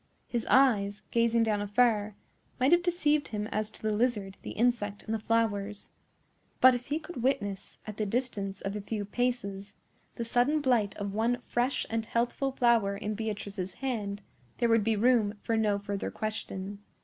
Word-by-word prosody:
His 235 -2 -2
eyes, 210 -7 +4
gazing 230 0 +3
down 210 -2 +1
afar, 210 -1 +2 0.4
might 260 +2 +3
have 345 0 +6
deceived 305 -4 +1
him 210 -1 -3
as 215 0 -1
to - - -15
the 215 - +1
lizard, 210 -3 0
the - - -7
insect, 220 -3 0
and 220 - -3
the 225 - 0
flowers; 210 -2 -1 0.7
but 260 0 +8
if 245 0 -4
he 290 - 0
could 325 -4 -7
witness, 205 -6 -1
at 215 -1 -7
the 215 - 0
distance 205 -4 -2
of 195 +1 -3
a 210 - -3
few 205 0 -3
paces, 205 -3 -2 0.4
the 235 - -3
sudden 245 +6 +2
blight 245 -8 +1
of 200 -1 -4
one 230 +3 +1
fresh 245 +3 0
and 225 0 -2
healthful 240 +4 0
flower 230 -6 +3
in 210 +1 -3
Beatrice's 205 -4 -4
hand, 210 -6 -3 0.3
there 235 - +2
would 225 -2 +4
be 225 +1 +2
room 220 -1 +3
for 230 - 0
no 215 -2 +2
further 200 -1 -3
question. 205 -2 -5
220 Hz, 175 wpm, -30 LUFS, 205-245 Hz, 0.7 s, but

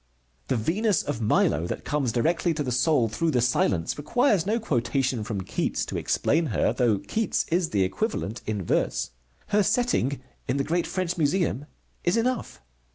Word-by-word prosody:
The - - +1
Venus 185 - +1
of 145 -5 -3
Milo, 85 -6 +2
that - - -5
comes 140 -4 0
directly 165 +7 +1
to 150 - -1
the 130 - -3
soul 125 0 +3
through 165 +10 -1
the 130 -5 +2
silence, 110 - +1
requires 210 - +2
no 225 +3 +1
quotation 130 - 0
from 105 -2 -3
Keats - - -2
to - - -6
explain 160 +2 +1
her, 115 - +1
though 120 -5 +2
Keats 220 - -1
is 170 -1 +2
the 100 -2 +2
equivalent 110 - -2
in 105 -3 -2
verse. 70 - 0 0.4
Her 210 0 +3
setting 200 - +1 0.3
in 130 - 0
the 140 - +1
great 170 +4 0
French 180 -2 -2
Museum 150 -2 +1 0.4
is 175 +6 +2
enough. 245 - -2
145 Hz, 170 wpm, -26 LUFS, 115-180 Hz, 0.4 s, soul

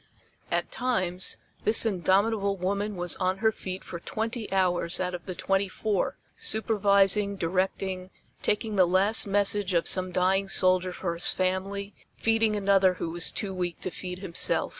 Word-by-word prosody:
At - - -1
times 185 -8 -1 0.3
this 215 +2 +5
indomitable 200 +1 +1
woman 200 +3 -2
was 175 -1 0
on 185 +1 0
her 220 +2 +2
feet 190 -3 -7
for 170 - -7
twenty 225 +4 -4
hours 180 -3 +1
out 180 -1 -2
of 175 +1 -7
the 185 - -5
twenty 195 +2 0
four, 205 0 -1 0.2
supervising, 200 -2 +2
directing, 185 +1 -2 0.3
taking 210 0 -1
the 185 -2 +5
last 195 +5 +3
message 200 -1 +2
of 170 - +2
some 185 -1 0
dying 190 +2 +1
soldier 185 -1 +2
for 175 -1 -3
his 170 - +1
family, 195 +2 -2 0.2
feeding 225 -1 +2
another 195 -2 +3
who 165 - -4
was 175 +1 0
too 195 -2 -4
weak 180 -2 -3
to 185 - -3
feed 180 0 -6
himself. 180 -3 0
190 Hz, 160 wpm, -27 LUFS, 185-205 Hz, 0.3 s, this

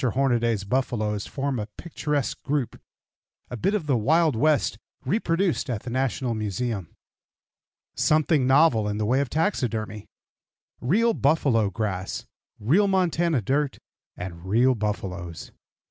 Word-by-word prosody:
HORNADAY'S 120 -4 +1
BUFFALOES 105 -3 -1
FORM 135 -2 -2
A 105 - -4
PICTURESQUE 150 -4 -2
GROUP 140 -3 -2 0.7
A - - -3
BIT 195 - 0
OF 190 -7 -2
THE 140 -4 +2
WILD 155 +6 +3
WEST 145 -3 +2 0.3
REPRODUCED 165 - 0
AT 115 -4 -3
THE 120 - -6
NATIONAL 130 -1 -1
MUSEUM 110 -3 -3 1.0
SOMETHING 155 -3 +2
NOVEL 130 -6 +4
IN 105 0 -2
THE 105 - -1
WAY 125 +5 +2
OF 140 - -2
TAXIDERMY 115 - -1 0.7
REAL 225 - +2
BUFFALO 135 - +2
GRASS, 100 -3 -3 0.3
REAL 165 - +3
MONTANA 170 - +1
DIRT, 140 +5 0 0.4
AND 85 -2 -7
REAL 120 +7 +3
BUFFALOES. 95 -6 -4
125 Hz, 125 wpm, -25 LUFS, 105-150 Hz, 1.0 s, NOVEL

